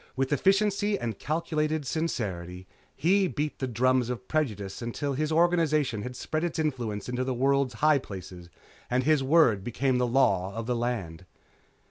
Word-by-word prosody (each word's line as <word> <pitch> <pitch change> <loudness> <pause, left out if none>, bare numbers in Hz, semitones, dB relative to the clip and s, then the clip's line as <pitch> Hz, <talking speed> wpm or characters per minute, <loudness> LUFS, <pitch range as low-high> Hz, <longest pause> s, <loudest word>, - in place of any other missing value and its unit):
With 135 +2 0
efficiency 200 +4 +2
and 115 -3 -4
calculated 155 -1 -1
sincerity, 95 - -3 0.3
he 190 +4 +3
beat 150 -2 -3
the 130 - -1
drums 125 +1 +1
of 125 0 -5
prejudice 105 -12 -2
until 130 +4 -3
his 155 +3 -1
organization 155 -8 +2
had 125 +4 -6
spread 155 +5 -3
its 175 0 -2
influence 120 -10 -2
into 125 +1 -2
the 130 -1 -2
world's 135 0 +1
high 155 -2 +5
places 90 -5 -9 0.4
and 125 +1 +1
his 155 0 +3
word 130 - +4
became 125 +3 0
the 125 - +2
law 100 -7 +2
of 115 0 -4
the 125 +1 -1
land. 95 -8 -3
130 Hz, 160 wpm, -27 LUFS, 115-155 Hz, 0.4 s, high